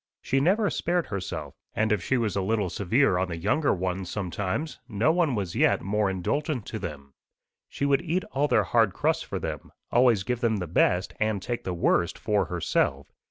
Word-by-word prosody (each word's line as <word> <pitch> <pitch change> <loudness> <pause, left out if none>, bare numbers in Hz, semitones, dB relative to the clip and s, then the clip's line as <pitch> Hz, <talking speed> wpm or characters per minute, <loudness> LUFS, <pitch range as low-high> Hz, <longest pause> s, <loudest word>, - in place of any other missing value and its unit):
She 135 - 0
never 195 +8 +2
spared 175 0 0
herself; 90 -8 -5 0.2
and 110 +1 +1
if 105 -4 +2
she 130 - +1
was 115 -4 -1
a 100 - +1
little 100 -2 0
severe 100 +1 +2
on 95 - 0
the 85 -2 -5
younger 110 - +1
ones 90 0 -2
sometimes, 100 - -3
no 115 +7 +2
one 165 -6 +2
was 95 -5 -3
yet - - +3
more 105 +1 +1
indulgent 125 - -2
to 110 - -5
them. 70 -7 -7 0.6
She 140 - -2
would 140 +1 +3
eat 175 +2 -1
all 140 +2 +1
their 125 - +3
hard 110 -5 +2
crusts - - +1
for - - -5
them, - - -5 0.2
always 120 -5 +4
give 125 +3 -2
them 115 -2 +1
the 90 - -3
best 90 +2 +1
and 110 -2 +1
take 120 +5 -4
the 90 - -2
worst 85 0 +1
for 105 -3 +1
herself. 70 -5 -1
105 Hz, 200 wpm, -27 LUFS, 90-130 Hz, 0.6 s, always